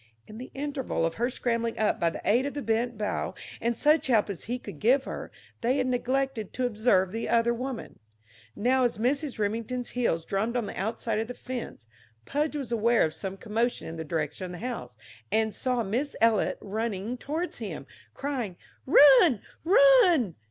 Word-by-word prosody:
In 215 +1 -11
the 255 - -8
interval 275 - -2
of 165 - -1
her 240 - +2
scrambling 235 -2 -1
up 215 - +1
by 170 - +3
the - - -8
aid 245 +6 +3
of 285 - -6
the 290 - -3
bent 225 +1 0
bough 210 0 -2 0.3
and 235 0 0
such 305 0 +3
help 220 -5 +3
as 190 - -8
he 245 +3 -2
could 205 -10 -10
give 260 +5 +4
her, - - -6 0.3
they 250 +3 +2
had 260 - +1
neglected 255 -2 -1
to 255 - -1
observe 210 -5 +2
the 225 +2 -3
other 235 0 +3
woman. 250 0 -6 0.6
Now, 255 +4 +2
as 240 - +1
Mrs. 275 +5 0
Remington's 230 +4 -2
heels 200 -10 -1
drummed 220 +5 -1
on 235 - -1
the - - -6
outside 220 +2 -2
of 225 - -2
the 245 - -7
fence, 245 - -7 0.4
Pudge 300 +1 -1
was 270 -5 -4
aware 235 -1 +3
of 155 - -3
some 190 +4 -5
commotion 230 +4 -1
in 165 - -6
the 160 - -4
direction 155 +2 -3
of 180 - -7
the 180 +7 -7
house, 225 - -6 0.3
and 220 -1 +1
saw 250 -2 0
Miss 245 +8 -2
Eliot 225 -2 +3
running 215 +1 -3
toward 315 +7 -3
him, 190 - -6 0.3
crying: 250 -10 -3 0.3
"Run, 275 - +7 0.2
run!" 375 - +5
235 Hz, 185 wpm, -28 LUFS, 210-260 Hz, 0.6 s, Run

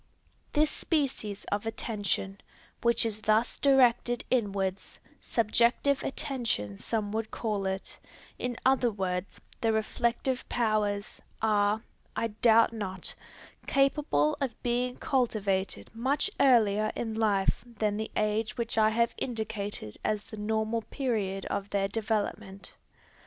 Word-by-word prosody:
This 300 0 +3
species 260 - -1
of 205 +2 -1
attention, 200 -3 -2 0.4
which 235 0 +4
is 215 -2 -2
thus 215 +2 +2
directed 245 -3 +4
inwards, 200 -5 -1 0.2
subjective 235 +5 +2
attention 230 - -2
some 215 -3 -2
would 220 0 -2
call 210 -4 -2
it, 190 0 -4 0.4
in 245 -1 -2
other 260 -2 +4
words, 190 -3 -3 0.2
the 225 - +3
reflective 235 +4 -1
powers, 210 -3 0 0.2
are, 210 0 +2 0.3
I 230 - 0
doubt 225 +1 +4
not, 190 -5 -4 0.5
capable 275 - +2
of 260 -5 -2
being 245 +1 0
cultivated 200 - 0
much 265 - 0
earlier 215 -5 +4
in 225 -2 -3
life 210 -3 +1
than 215 -3 -2
the 220 0 -3
age 215 +3 0
which 230 -1 0
I 215 0 +5
have 235 +1 +1
indicated 215 - -3
as 215 -1 0
the 215 - -10
normal 220 +2 0
period 210 -7 -2
of 200 0 -3
their 195 -1 +1
development. 210 -2 -3
220 Hz, 120 wpm, -29 LUFS, 205-240 Hz, 0.5 s, I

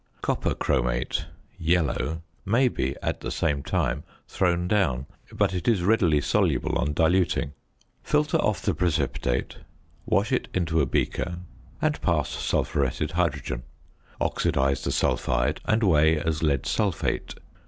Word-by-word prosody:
Copper - - 0
chromate 60 -1 0 0.3
(yellow) 80 -2 0 0.2
may 125 +6 +3
be 65 - -2
at - - -1
the - - -5
same 75 -3 0
time 70 +1 -1 0.2
thrown 90 -1 +1
down, 75 -11 +1 0.3
but - - +1
it 90 -2 -3
is 110 -7 +3
readily 90 -7 +3
soluble - - +1
on 75 - 0
diluting. 80 -2 +2 0.5
Filter 150 0 +1
off 105 - 0
the 100 - +1
precipitate; 75 -7 -1 0.5
wash 110 +1 +2
it 125 - 0
into 80 -3 +1
a 70 - +1
beaker 85 +6 -1 0.5
and - - +1
pass - - +1
sulphuretted 70 +2 -1
hydrogen; 75 -8 -1 0.6
oxidise 70 0 +1
the - - -1
sulphide 60 +5 0
and 115 -2 +2
weigh 80 -4 +4
as 80 0 -1
lead 70 -5 +1
sulphate. 100 -6 -1
80 Hz, 130 wpm, -26 LUFS, 70-95 Hz, 0.6 s, weigh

